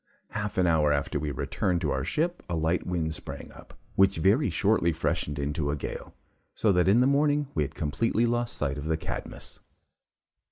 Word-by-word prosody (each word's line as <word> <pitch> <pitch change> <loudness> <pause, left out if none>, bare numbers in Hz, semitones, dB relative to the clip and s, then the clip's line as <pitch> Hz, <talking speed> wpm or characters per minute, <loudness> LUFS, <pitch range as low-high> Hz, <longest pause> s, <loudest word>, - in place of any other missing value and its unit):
Half 105 -1 -4
an 90 - +4
hour 80 -3 +3
after 70 +1 0
we 75 +1 -2
returned 85 +5 -1
to 75 - 0
our 65 - -1
ship, 165 - -1
a 85 - -1
light 80 +2 0
wind 85 -3 -1
sprang - - -7
up, - - -15 0.2
which 95 0 +4
very 100 - +3
shortly 95 -1 +2
freshened 75 -2 -1
into 70 +1 -1
a 70 - 0
gale, 75 - -6 0.4
so 110 - +3
that 90 -1 +3
in 105 +6 +5
the - - +4
morning 145 +1 +2
we 75 - 0
had 75 - -3
completely 115 +9 0
lost 120 0 -1
sight 70 -1 -1
of 70 - -6
the 80 0 0
'Cadmus.' 80 - -7
85 Hz, 195 wpm, -28 LUFS, 75-110 Hz, 0.4 s, in